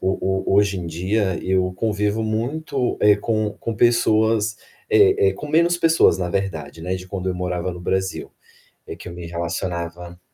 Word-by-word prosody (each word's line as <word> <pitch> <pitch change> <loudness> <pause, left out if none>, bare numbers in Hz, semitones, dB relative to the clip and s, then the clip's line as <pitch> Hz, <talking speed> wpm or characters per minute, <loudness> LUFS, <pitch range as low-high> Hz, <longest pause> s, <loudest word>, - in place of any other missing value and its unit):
ho 95 +1 0
ho 95 0 -1
hoje 100 -1 +3
em 85 - -5
dia, 95 +3 -1
eu 95 -1 +1
convivo 105 +2 -1
muito, 125 +5 -2
eh, 105 -1 +6
com 110 0 -1
com 115 - -4
pessoas 110 -1 +2 0.3
eh, 415 0 +5
eh, - - -3
com 150 - -8
menos 170 +3 +3
pessoas 165 - +4
na 90 -1 -2
verdade, 85 -5 -4
né, 90 +2 -2
de 90 0 -7
quando 95 -1 -3
eu - - -3
morava 90 0 -3
no 90 - -9
Brasil, 95 +1 -2 0.6
é - - -6
que - - -11
eu 85 - -7
me 85 -1 -8
relacionava 85 0 -4
95 Hz, 180 wpm, -21 LUFS, 90-110 Hz, 0.6 s, eh